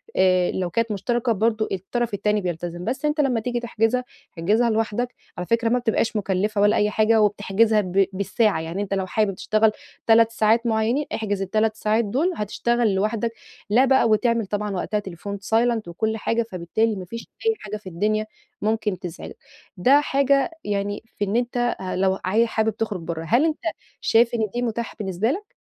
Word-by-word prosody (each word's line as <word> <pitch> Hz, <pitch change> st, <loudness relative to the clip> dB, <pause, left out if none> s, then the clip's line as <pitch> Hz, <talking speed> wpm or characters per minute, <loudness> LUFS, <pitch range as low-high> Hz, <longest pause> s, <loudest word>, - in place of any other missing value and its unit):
آآ، 185 Hz, -1 st, +3 dB
لو 185 Hz, -2 st, -2 dB
كانت 230 Hz, +5 st, -1 dB
مشتركة 235 Hz, +4 st, 0 dB
برضه، 220 Hz, +1 st, +1 dB
الطرف 210 Hz, +5 st, -2 dB
التاني 210 Hz, +1 st, +1 dB
بيلتزم. 175 Hz, -1 st, -4 dB
بس 265 Hz, +5 st, -2 dB
أنت 300 Hz, 0 st, +2 dB
لمّا 255 Hz, -5 st, +1 dB
تيجي 240 Hz, +2 st, -2 dB
تحجزها، 235 Hz, +1 st, 0 dB, 0.3 s
احجزها 215 Hz, +8 st, +2 dB
لوحدك، 225 Hz, +2 st, -1 dB, 0.2 s
على 180 Hz, -, -4 dB
فكرة، 230 Hz, 0 st, +2 dB
ما 250 Hz, +2 st, +2 dB
بتبقاش 230 Hz, -1 st, 0 dB
مُكلِّفة 200 Hz, +1 st, 0 dB
ولا 205 Hz, 0 st, +4 dB
أي 210 Hz, -, +2 dB
حاجة، 220 Hz, +1 st, +3 dB
وبتحجزها 210 Hz, +1 st, +2 dB
ب 190 Hz, +1 st, +2 dB
بالساعة. 200 Hz, -1 st, +1 dB
يعني، 165 Hz, +5 st, -4 dB
أنت 200 Hz, -1 st, -3 dB
لو 190 Hz, -1 st, 0 dB
حابب 200 Hz, +1 st, 0 dB
تشتغل 215 Hz, +2 st, +2 dB, 0.4 s
3 225 Hz, 0 st, +5 dB
ساعات 225 Hz, +1 st, +2 dB
معيَّنين، 230 Hz, +6 st, +1 dB
احجز 205 Hz, -3 st, -2 dB
ال3 215 Hz, +3 st, 0 dB
ساعات 220 Hz, +1 st, +1 dB
دول، 295 Hz, -, 0 dB
هتشتغل 225 Hz, +1 st, 0 dB
لوحدك، 215 Hz, +3 st, 0 dB, 0.4 s
لا 240 Hz, +6 st, +5 dB
بقى 265 Hz, -3 st, +4 dB
وتعمل 230 Hz, +1 st, +2 dB
طبعًا 205 Hz, +1 st, -3 dB
وقتها 200 Hz, +3 st, -1 dB
التليفون 200 Hz, 0 st, -6 dB, 0.2 s
silent 230 Hz, -4 st, +2 dB
وكل 220 Hz, +6 st, -2 dB
حاجة، 230 Hz, +2 st, 0 dB
فبالتالي 215 Hz, +3 st, -1 dB
ما 185 Hz, -2 st, -6 dB
فيش 230 Hz, +5 st, -8 dB, 0.2 s
أي 450 Hz, -, +4 dB
حاجة 210 Hz, 0 st, -6 dB
في 205 Hz, -3 st, -10 dB
الدنيا 215 Hz, +5 st, 0 dB, 0.4 s
ممكن 210 Hz, -3 st, -1 dB
تزعجك. 175 Hz, -3 st, -8 dB, 0.4 s
ده 265 Hz, +10 st, +5 dB
حاجة 275 Hz, +2 st, +2 dB
يعني، 205 Hz, 0 st, -2 dB
في 205 Hz, -, 0 dB
إن 200 Hz, +2 st, -2 dB
أنت 240 Hz, 0 st, 0 dB
ه 185 Hz, -, -3 dB
لو 190 Hz, 0 st, +2 dB
ه 215 Hz, +5 st, +3 dB
حابب 220 Hz, -1 st, -1 dB
تُخرِّج 210 Hz, -5 st, -2 dB
برَّه. 165 Hz, -1 st, -4 dB
هل 240 Hz, -, +3 dB
أنت 315 Hz, -1 st, 0 dB, 0.4 s
شايف 235 Hz, +1 st, +3 dB
إن 220 Hz, -2 st, 0 dB
دي 245 Hz, -, 0 dB
متاحة 235 Hz, -1 st, -3 dB
بالنسبة 195 Hz, +3 st, 0 dB
لك؟ 410 Hz, +7 st, -6 dB
215 Hz, 180 wpm, -23 LUFS, 195-235 Hz, 0.4 s, 3